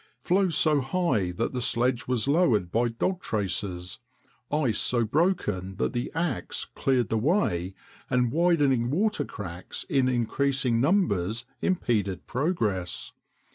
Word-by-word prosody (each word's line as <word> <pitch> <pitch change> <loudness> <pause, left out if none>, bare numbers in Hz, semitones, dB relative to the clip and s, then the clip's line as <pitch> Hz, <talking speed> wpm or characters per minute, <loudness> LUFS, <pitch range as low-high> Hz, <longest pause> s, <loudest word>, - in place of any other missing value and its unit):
Floes 185 -2 +1
so 150 -3 +3
high 130 - 0
that 90 +9 -2
the 125 - -2
sledge 120 +1 0
was 125 -1 0
lowered 125 - +2
by 120 +2 +2
dog 180 +11 -2
traces, 95 -3 -3 0.5
ice 145 -7 +1
so 120 -2 +2
broken 105 - 0
that - - -1
the 120 - -2
ax 160 - -2
cleared 125 -5 0
the 110 - +1
way, 100 - 0 0.3
and 125 -2 +2
widening 145 -7 +2
water 205 +9 +1
cracks 90 -4 -7
in 135 -2 +1
increasing 125 0 +1
numbers 120 - +1 0.2
impeded 105 - 0
progress. 115 - -2
125 Hz, 130 wpm, -27 LUFS, 105-155 Hz, 0.5 s, so